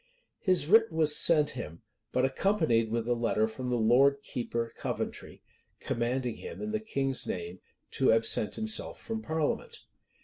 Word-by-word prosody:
His 185 -6 +2
writ 225 +6 +5
was 155 -2 +3
sent 150 -3 +4
him, 80 +3 -8 0.3
but 130 - +1
accompanied 135 - +1
with 115 0 -2
a 120 - +2
letter 115 -2 0
from 125 +3 -6
the 125 - 0
lord 135 +5 +3
keeper 115 -1 -4
Coventry, - - -5 0.4
commanding 120 0 -2
him, - - -9
in 210 0 -4
the 215 - -1
king's 135 - -1
name, 90 0 -5 0.3
to - - +2
absent 115 -1 +3
himself 220 0 -1
from 225 -1 -5
parliament. 220 - -3
130 Hz, 150 wpm, -29 LUFS, 115-170 Hz, 0.4 s, writ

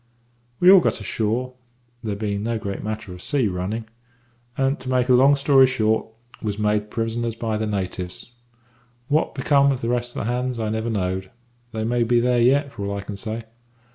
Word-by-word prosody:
"We 180 +1 +8
all 195 - +9
got 170 - 0
ashore, 115 +4 -2 0.5
there 105 -3 -2
bein' 100 -1 -2
no 115 +1 -1
great 100 -3 -5
matter 110 -2 -5
of 90 - -9
a - - -12
sea 135 -2 +1
running, 100 +5 -3 0.7
and, 135 +2 +1
to 130 - -7
make 125 0 +1
a - - +6
long 135 +3 +6
story 135 -1 +5
short, 110 -4 +1 0.3
was 105 -2 -3
made 105 0 0
prisoners 115 +1 -2
by 115 -1 -2
the 110 0 -2
natives. 95 0 -4 0.8
What 150 +2 +1
become 140 -1 +3
of 130 - -2
the 115 - -2
rest 120 0 -1
of - - -3
the 120 - 0
hands 125 -1 -2
I 110 -1 -1
never 110 +2 -2
knowed 95 -3 -2 0.4
they 110 0 -3
may 120 +2 0
be 120 +1 +3
there 120 0 +2
yet 140 +4 +3
for 105 -5 -6
all 100 0 -2
I - - -4
can 100 0 -7
say. 110 +3 -5
115 Hz, 200 wpm, -23 LUFS, 105-125 Hz, 0.8 s, all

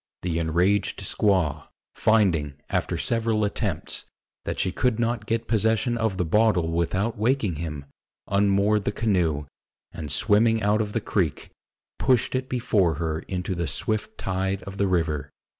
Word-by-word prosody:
The 85 -2 -1
enraged 90 +5 +1
squaw, 95 -9 +1 0.3
finding, 90 -10 +2 0.2
after - - 0
several 115 -2 +1
attempts, 100 - -2 0.4
that - - -3
she 95 - 0
could 125 +3 +1
not 115 -2 -1
get 115 0 -1
possession 110 +2 +2
of 110 -4 -1
the 90 - 0
bottle 90 -2 +2
without 95 +7 -1
waking 110 - +1
him, 75 -3 -5 0.4
unmoored 100 +1 +2
the - - +1
canoe, 90 -10 0 0.5
and 75 -3 -6
swimming 110 +4 +3
out 105 +2 +3
of 105 -1 -3
the 115 - 0
creek, 90 -8 -1 0.5
pushed 130 -3 +2
it 130 0 -2
before 105 -9 +1
her 80 0 -2
into 95 0 -3
the 85 -2 -2
swift 110 0 -3
tide 95 +1 -2
of 95 0 -8
the 100 - +2
river. 80 -6 0
100 Hz, 150 wpm, -25 LUFS, 85-110 Hz, 0.5 s, swimming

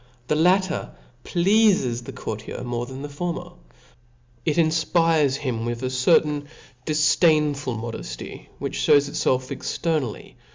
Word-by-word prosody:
The 150 - +3
latter 180 +3 +1 0.3
pleafes 185 - +2
the - - -6
coiirtierxnorc 120 +3 -5
th^n 130 +1 -7
the - - -4
formen 170 +4 -5 0.9
It 155 - 0
jnfpires 160 -3 +2
him 125 -5 -3
with 120 +1 -3
a 130 - -1
certain 145 +2 +2 0.4
difdainfui 150 -5 +2
modefty, 110 - -7
which - - -4
fhcws 140 - +4
itfelf 130 -2 0
externally 155 -9 -3
145 Hz, 115 wpm, -23 LUFS, 125-165 Hz, 0.9 s, fhcws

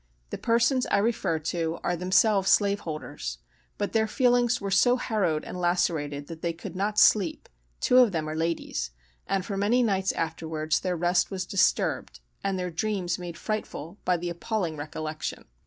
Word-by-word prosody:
The - - -3
persons 235 +2 +2
I - - +2
refer 205 -6 +1
to 160 +1 -2
are 175 - 0
themselves 190 +3 +3
slave 200 -1 +4
holders,—but 65 - -6
their 220 -1 +2
feelings 245 0 +3
were 200 -1 -4
so 245 +6 +5
harrowed 205 -11 0
and 180 - -6
lacerated 155 -5 0
that 165 +1 -9
they 170 -1 -1
could 175 +2 -9
not 205 +3 -1
sleep 195 -7 +4 0.3
(two 250 - +5
of 245 -4 +6
them 160 -3 -2
are 155 - -3
ladies); 160 - -2 0.4
and 195 -1 0
for 200 -2 -4
many 225 +5 +3
nights 195 -4 +1
afterwards 160 -1 -1
their 180 -2 -2
rest 175 +2 +2
was 190 -1 -3
disturbed, 195 - +1 0.2
and 195 -1 0
their 180 -1 -3
dreams 180 0 -1
made 175 -1 -7
frightful, 200 -4 -5
by 180 -1 +2
the 175 +1 -4
appalling 175 -1 -2
recollection. 155 +1 -5
180 Hz, 170 wpm, -27 LUFS, 160-210 Hz, 0.4 s, of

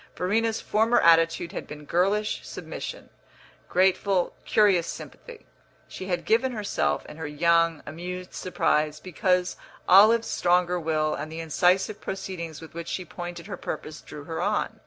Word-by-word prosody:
Verena's 220 +5 0
former 225 +3 +2
attitude 165 0 +4
had - - -6
been 150 0 -9
girlish 200 +6 +1
submission, - - -7 0.6
grateful, 190 0 +2
curious 195 -6 +3
sympathy. 480 -2 -9 0.4
She 185 - -8
had 180 -2 -2
given 235 +4 +2
herself, 200 - -1
in 150 - -11
her 160 -2 -5
young, 165 +1 +2
amused 180 +4 -7
surprise, 150 -4 0
because 180 +1 0 0.3
Olive's 220 +5 +7
stronger 180 0 +2
will 155 -1 0
and 155 - -5
the 160 - -6
incisive 180 +5 +1
proceedings 175 -5 -5
with 160 - -11
which 170 0 -6
she 185 - -3
pointed 175 -1 -7
her 200 - -6
purpose 155 0 -6
drew 150 - -10
her 160 +2 -4
on. - - -1
180 Hz, 145 wpm, -26 LUFS, 165-195 Hz, 0.6 s, Olive's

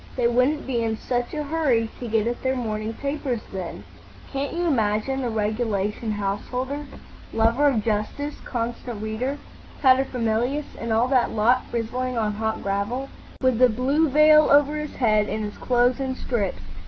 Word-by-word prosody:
They 245 -2 +2
wouldn't 255 +5 +2
be 245 -3 -1
in 220 -1 -1
such 245 +1 -2
a 300 - -2
hurry 280 -7 +1
to 245 - -5
get 220 -1 +1
at 240 +1 -2
their 260 0 0
morning 220 -2 -3
papers 275 -3 -3
then. 185 -3 -5 0.5
Can't 275 +1 -2
you 350 +1 -1
imagine 235 -2 +1
the 245 - -1
regulation 215 -1 -1
householder—Lover 250 +3 -2
of 235 -7 +2
Justice, 225 +7 -2
Constant 235 -2 -4
Reader, 240 +6 -2 0.4
Paterfamilias, 255 0 +2
and 230 - -3
all 225 +3 +3
that 260 -3 +3
lot—frizzling 245 +2 0
on 215 -1 +1
hot 220 +1 -2
gravel?" 205 +7 -2 0.3
"With 255 -2 +2
a 255 - +7
blue 275 +7 +2
veil 305 +2 +6
over 290 +1 +5
his 300 -1 -5
head, 215 -4 +2
and 215 +1 -2
his 205 0 -6
clothes 245 +1 +2
in 265 -1 -2
strips. 200 - -2
245 Hz, 155 wpm, -24 LUFS, 220-270 Hz, 0.5 s, a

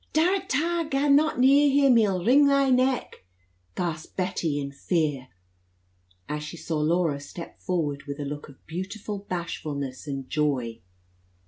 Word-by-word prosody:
"Darrat 370 +4 +2
ta! 335 +5 +1
gaa 275 +1 +1
not 295 +1 +4
near 280 +3 +5
him! 275 -2 +5
he'll 195 -5 +2
wring 280 +5 +6
thy 275 -1 +3
neck!" 255 - +1 0.5
gasped 165 -3 -4
Bessie 175 -5 -1
in 140 -1 -3
great 140 0 -17
fear, 150 -7 0 1.0
as 150 0 -3
she 150 +3 -7
saw 160 -1 -3
Laura 160 -1 +1
step 165 +4 -10
forward 150 -6 -2
with 140 +1 -5
a 145 - -3
look 145 +1 -6
of 135 - -18
beautiful 195 +5 -5
bashfulness 150 -6 -4
and 135 -2 -4
joy. 130 -7 -1
175 Hz, 150 wpm, -26 LUFS, -, 1.0 s, wring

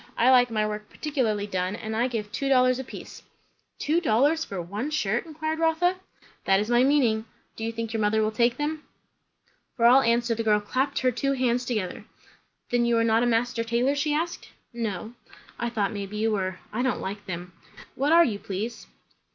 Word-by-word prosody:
I 250 +3 +5
like 245 -1 +5
my 215 -2 0
work 210 0 -5
particularly 240 -9 -1
done, 185 -1 -2
and 220 0 -5
I 235 +3 +2
give 215 -4 -4
two 275 +4 -2
dollars 255 -1 +4
a - - -3
piece." - - -10 0.6
"Two 320 +4 +1
dollars 290 +4 +2
for 195 - -6
one 200 - -4
shirt?" 240 -3 -1
inquired 315 0 -3
Rotha. 330 +3 +2 0.5
"That 195 0 +4
is 210 +3 -2
my 240 +1 +5
meaning. 250 -6 +2 0.3
Do 225 - -7
you 225 - -1
think 230 0 -5
your 225 - -1
mother 215 +1 +2
will 215 - 0
take 235 +2 +2
them?" 300 +1 -2 1.0
For 235 - +2
all 255 +3 +7
answer 235 -1 +2
the 230 - -2
girl 215 -2 +3
clapped 260 +7 -1
her 255 -1 +3
two 275 +3 -1
hands 250 -2 0
together. 215 -7 -3 0.7
"Then 245 0 +2
you 235 -1 +2
are 230 - +3
not 225 0 +3
a 245 - +2
master 230 0 +1
tailor?" 235 +4 +1
she 290 +1 0
asked. 330 +3 -2 0.2
"No." 220 -2 -4 0.5
"I 235 - -1
thought 210 -4 -1
maybe 205 0 -5
you 220 +1 +1
were. 185 -3 -1 0.2
I 230 - -1
don't 255 -3 0
like 205 +2 -6
them. 180 -1 -6 0.4
What 280 +3 0
are 335 +1 +7
you, 205 -4 -2
please?" 210 +5 -5
235 Hz, 200 wpm, -26 LUFS, 215-265 Hz, 1.0 s, all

